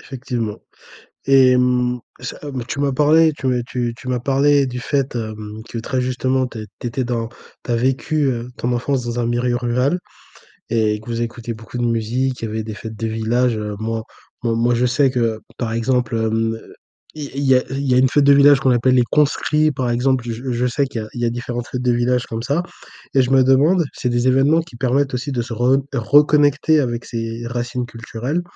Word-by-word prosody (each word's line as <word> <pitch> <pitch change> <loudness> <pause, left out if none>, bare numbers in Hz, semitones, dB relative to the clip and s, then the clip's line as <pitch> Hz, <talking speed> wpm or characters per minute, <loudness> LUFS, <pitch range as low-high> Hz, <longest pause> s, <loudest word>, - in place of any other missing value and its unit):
Effectivement. 120 -5 -4 0.7
Et 135 -1 +6
hem, 125 -1 +2 0.2
ça, 125 - -6
hem, 135 -5 -5
tu 140 - -4
m'as 140 -1 +1
parlé 155 +3 +4
tu, 135 - -4
heu, 125 -1 +1
tu 120 -2 -2
tu 130 - -10
m'as 125 - 0
parlé 140 +1 +3
du 125 -1 -5
fait, 135 0 -1
hem, 110 -1 -6
que - - -8
très 130 +3 -2
justement 130 +1 0
tu 115 - -9
as 110 - -5 0.2
tu - - -4
étais 125 +2 -2
dans 115 -2 -2 0.4
tu - - -6
as - - +2
vécu, 135 +5 0
heu, 120 -1 -4
ton 120 +1 -1
enfance 125 +1 -1
dans 120 0 -2
un 115 - 0
milieu 120 +1 0
rural 125 +7 0 0.7
et 110 -2 +1
que 110 - -17
vous 115 -1 -3
écoutez 115 0 -5
beaucoup 115 +2 -8
de 120 - 0
musique. 120 +3 -1
Il - - -1
y - - -5
avait 110 +1 -3
des 110 -1 -6
fêtes 110 +1 -8
de 115 - -3
village, 115 +2 0
heu. 105 -1 -4
Moi 110 0 -3 0.4
moi 115 -1 +1
moi, 120 +1 +2
je 125 +1 +2
sais 130 +2 +2
que 115 -3 -1 0.2
par 115 -2 -2
exemple, 115 0 0
hem, 115 0 0 0.6
il 150 -2 -6
y - - -6
il 140 - -1
y 135 -1 +5
a 125 - +2
il 135 0 -2
y - - +4
a 125 - +5
une 130 0 +5
fête 145 -1 +3
de 140 - +7
village 140 0 +6
qu'on 130 - +2
appelle 125 +1 +3
«les 125 - +5
conscrits,» 150 +1 +2
par 125 -3 -2
exemple, 125 +1 +1
je 120 +3 -4
je 120 +1 0
sais 140 +3 +1
qu'il 125 -4 -5
y - - -5
a 110 - -10
il 120 - -5
y - - +2
a 115 - +2
différentes 120 0 -4
fêtes 125 - -4
de 125 -1 +2
village 120 0 +1
comme 115 0 -5
ça 145 +7 0 0.5
et 135 - +5
je 125 - -1
me 135 -1 +5
demande 150 +7 +4
c'est 125 - -2
des 120 +1 +1
événements 140 +5 +4
qui 160 -7 -11
permettent 135 +2 0
aussi, 130 +3 -3
de 120 -2 -1
se 120 0 -6
re 125 +4 +3 0.2
reconnecter 145 +4 +4
avec 120 -3 -2
ses 115 0 -4
racines 120 +1 -3
culturelles. 120 +7 -4
125 Hz, 230 wpm, -20 LUFS, 115-135 Hz, 0.7 s, de